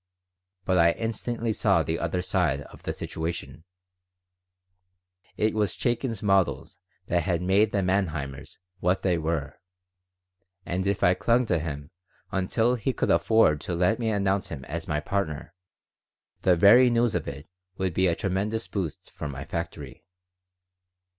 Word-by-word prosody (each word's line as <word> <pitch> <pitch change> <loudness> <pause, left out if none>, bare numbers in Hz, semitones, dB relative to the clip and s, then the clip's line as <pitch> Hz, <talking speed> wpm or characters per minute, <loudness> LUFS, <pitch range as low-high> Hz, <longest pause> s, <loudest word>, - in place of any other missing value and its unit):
But 95 -1 +2
I 85 0 +5
instantly 115 0 -2
saw - - +3
the 80 - -2
other 90 +2 -1
side 85 -8 +1
of - - -13
the - - -3
situation: 80 0 -5 1.7
It 110 +1 +1
was 105 -4 0
Chaikin's 120 -3 -2
models 95 -9 +1 0.3
that 85 0 +1
had 85 0 -1
made 100 +4 +3
the 100 -2 0
Manheimers 75 -8 -2 0.2
what 90 +2 +1
they 90 -3 +2
were, 80 -2 -3 1.1
and 95 +2 -2
if 100 -1 0
I 90 - +6
clung 115 +7 +2
to 90 -6 +1
him 75 -1 -6 0.4
until 110 +6 +1
he 125 +2 -1
could - - 0
afford 110 -10 +4
to 85 - -3
let 90 +7 +2
me 115 -2 0
announce 100 -2 0
him 65 -2 -7
as 80 +4 -5
my 75 -1 -1
partner 85 -3 -3 0.9
the 90 - +4
very 115 +8 +7
news 120 -1 +2
of - - -2
it 70 +2 -7 0.3
would 95 -2 -1
be 95 +2 +2
a 85 - +2
tremendous 105 +4 -2
boost 90 -7 -5
for 75 - -6
my 70 0 -6
factory. 80 -5 -6
90 Hz, 150 wpm, -26 LUFS, 80-105 Hz, 1.7 s, very